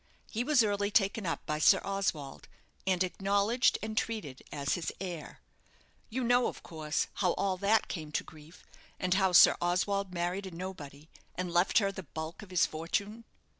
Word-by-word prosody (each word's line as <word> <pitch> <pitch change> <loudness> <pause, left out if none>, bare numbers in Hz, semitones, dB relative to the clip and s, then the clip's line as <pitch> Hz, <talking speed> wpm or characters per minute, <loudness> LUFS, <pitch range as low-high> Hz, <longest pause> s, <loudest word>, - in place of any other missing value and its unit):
He 230 +2 -1
was 285 -3 +4
early 205 -1 0
taken 200 -1 +1
up 165 - -3
by 150 0 -2
Sir - - +6
Oswald, 190 -8 -3 0.4
and 185 -1 +3
acknowledged 200 +6 +2
and 220 0 -4
treated 210 - -3
as 140 -1 -1
his 175 -4 -2
heir. 175 -4 -7 0.7
You 255 +3 -2
know, 245 +1 +3
of - - -7
course, 155 -2 -2
how 185 -3 +2
all 195 -2 0
that 200 +4 +2
came 155 -4 -6
to - - 0
grief, 155 +2 -15 0.4
and 180 0 +1
how 190 -1 +3
Sir 175 - +8
Oswald 185 +2 0
married 180 +2 -2
a - - -8
nobody, 155 -5 -8 0.3
and 180 -1 -3
left 175 +2 +3
her 200 -2 +3
the 190 - -7
bulk 160 +2 -7
of 205 - -12
his 180 -2 +3
fortune?" 200 +8 -3
185 Hz, 175 wpm, -31 LUFS, 165-205 Hz, 0.7 s, Sir